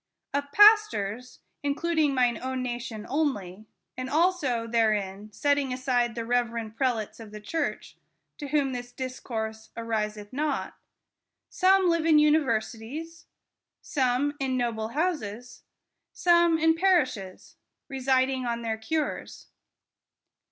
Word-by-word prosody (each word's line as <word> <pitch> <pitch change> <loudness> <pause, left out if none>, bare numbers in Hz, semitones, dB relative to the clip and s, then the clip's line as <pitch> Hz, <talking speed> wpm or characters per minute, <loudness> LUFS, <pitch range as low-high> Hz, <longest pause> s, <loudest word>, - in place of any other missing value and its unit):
Of 285 0 -2
Pastors 345 - +4 0.2
(intending 300 0 +1
mine 245 -3 +2
own 260 0 -3
nation 240 -3 -5
only; 215 - -2 0.3
and 255 +1 -5
also 300 -7 +1
therein 215 -3 0
setting 285 +2 +1
aside 250 -2 0
the 230 -1 -4
reverend 230 -2 -1
prelates 225 -4 -1
of 225 -2 -10
the 210 0 -9
church, 320 +10 -4 0.4
to 290 - -5
whom 280 -2 +1
this 245 0 -6
discourse 220 -4 -5
ariseth 215 -2 -3
not), 290 +1 -2 0.8
some 380 -1 +4
live 335 -1 +2
in 320 - +5
the 300 - +6
universities; 300 +2 -1 0.6
some 265 +1 0
in 260 -1 -1
noble 230 -3 -1
houses; 245 - -3 0.5
some 340 -1 +4
in 320 0 +4
par 365 -1 +4
ishes, 195 -7 -9 0.3
residing 260 -1 +1
on 235 0 -2
their 225 -1 -2
cures. 305 +6 -3
255 Hz, 120 wpm, -27 LUFS, 225-300 Hz, 0.8 s, the